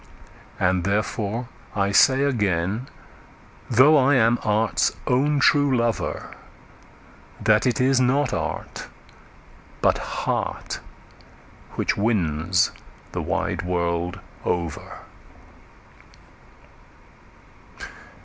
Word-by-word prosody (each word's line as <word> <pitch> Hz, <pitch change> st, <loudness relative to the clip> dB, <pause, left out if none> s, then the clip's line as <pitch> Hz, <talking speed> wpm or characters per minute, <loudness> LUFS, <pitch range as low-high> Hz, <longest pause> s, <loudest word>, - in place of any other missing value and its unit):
And 90 Hz, 0 st, +1 dB
therefore 105 Hz, +3 st, -2 dB, 0.3 s
I 100 Hz, -1 st, +1 dB
say 135 Hz, +6 st, +5 dB
again, 105 Hz, -3 st, 0 dB, 0.8 s
though 130 Hz, +6 st, +6 dB
I 140 Hz, +1 st, +4 dB
am 120 Hz, -1 st, +3 dB
art's 110 Hz, +1 st, +1 dB
own 140 Hz, +4 st, +2 dB
true 140 Hz, -1 st, +4 dB
lover, 115 Hz, -1 st, -2 dB, 1.1 s
That 110 Hz, +3 st, +3 dB
it 120 Hz, -, 0 dB
is 130 Hz, 0 st, +3 dB
not 130 Hz, +1 st, +1 dB
art, -, -, -4 dB, 0.9 s
but -, -, +2 dB
heart, -, -, -3 dB, 1.0 s
which -, -, 0 dB
wins 90 Hz, -5 st, +1 dB, 0.4 s
the -, -, -3 dB
wide -, -, -2 dB
world 85 Hz, 0 st, -2 dB, 0.2 s
over. 85 Hz, -3 st, -3 dB
110 Hz, 80 wpm, -23 LUFS, 95-130 Hz, 1.1 s, though